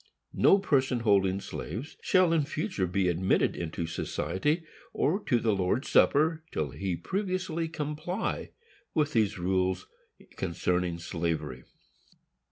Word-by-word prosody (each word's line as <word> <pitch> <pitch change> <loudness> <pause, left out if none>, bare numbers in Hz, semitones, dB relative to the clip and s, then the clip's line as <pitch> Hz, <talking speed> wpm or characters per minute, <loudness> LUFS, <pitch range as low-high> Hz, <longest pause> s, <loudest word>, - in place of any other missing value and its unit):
No 195 - +6
person 135 -10 +1
holding 100 -3 +3
slaves 110 - -6
shall 185 -3 +4
in 165 - +4
future 145 - -2
be 90 +1 +1
admitted 90 +2 +2
into 85 0 -3
society, 95 - -1 0.3
or 170 +8 +1
to 120 - +3
the 110 -2 +2
Lord's 95 +7 0
Supper, 155 +2 +4
till 75 -3 -2
he 95 +5 -2
previously 185 - -2
comply 155 +5 -3 0.5
with 150 -2 +1
these 110 -5 +2
rules 95 0 0 0.5
concerning 90 +1 -1
slavery. 80 -6 -3
105 Hz, 120 wpm, -29 LUFS, -, 0.5 s, No